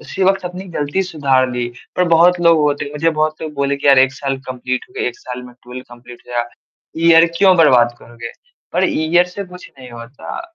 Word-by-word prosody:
उसी 195 - -5
वक़्त 195 0 +1
अपनी 180 +2 -6
ग़लती 145 +6 -1
सुधार 140 -7 0
ली। 125 -1 -3 0.3
पर 180 - +2
बहुत 170 +2 +4
लोग 170 -1 +4
होते 145 -1 0
हैं 145 - -9
मुझे 155 +3 0
बहुत 155 0 -2
लोग 155 -1 -6
बोले 140 0 -1
कि 140 - -5
यार 140 -2 +6
1 130 0 +4
साल 135 0 -3
कम्पलीट 125 0 -4
हो - - -23
गया। - - -2
1 120 - -10
साल 125 0 -8
में 125 -1 -13
12 125 +1 -9
कम्पलीट 120 0 -14
हो 125 - -14
गया। 120 -1 0 0.6
ईयर 165 0 +7
क्यों 190 0 +4
बर्बाद 125 -7 +4
करोगे? 115 0 -10 0.4
पर - - +1
ईयर 170 +3 +2
से 190 +3 -7
कुछ 180 0 -13
नहीं 130 -1 -12
होता। 120 - -9
145 Hz, 220 wpm, -17 LUFS, 125-170 Hz, 0.6 s, ईयर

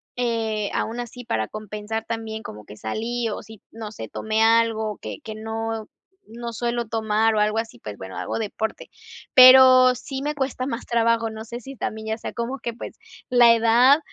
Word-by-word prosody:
eh, 225 -4 -1
aun 230 +2 -2
así, 245 +1 -9
para 110 - -1
compensar 215 +1 -5
también 225 -1 -4
como 105 0 -9
que 105 - -12
salí 230 - -3
o 210 - -5
si 220 -2 -14
no 220 -2 -8
sé, 110 - -8
tomé 220 - -2
algo 225 -2 +2
que - - -6
que 220 -1 -7
no 225 0 -4 0.4
no 235 +1 -7
suelo 235 +1 -2
tomar 220 0 +1
o - - +2
algo 210 +1 +2
así, 225 - -6
pues, 105 -2 -8
bueno, 95 0 -8
hago - - -3
deporte, 220 0 -4 0.5
pero 255 0 +9
sí 265 +2 -6
me 300 +1 -1
cuesta 265 -3 -3
más 255 -2 -5
trabajo. 230 -1 +2
No 220 0 -8
sé 235 +1 -7
si 270 +3 -10
también 220 -1 -5
ya 220 0 -2
sea - - -7
como 235 +3 -3
que, 235 -2 -5
pues, 230 - -9 0.3
la 240 -2 +7
edad 235 +5 +5
225 Hz, 190 wpm, -23 LUFS, 220-240 Hz, 0.5 s, pero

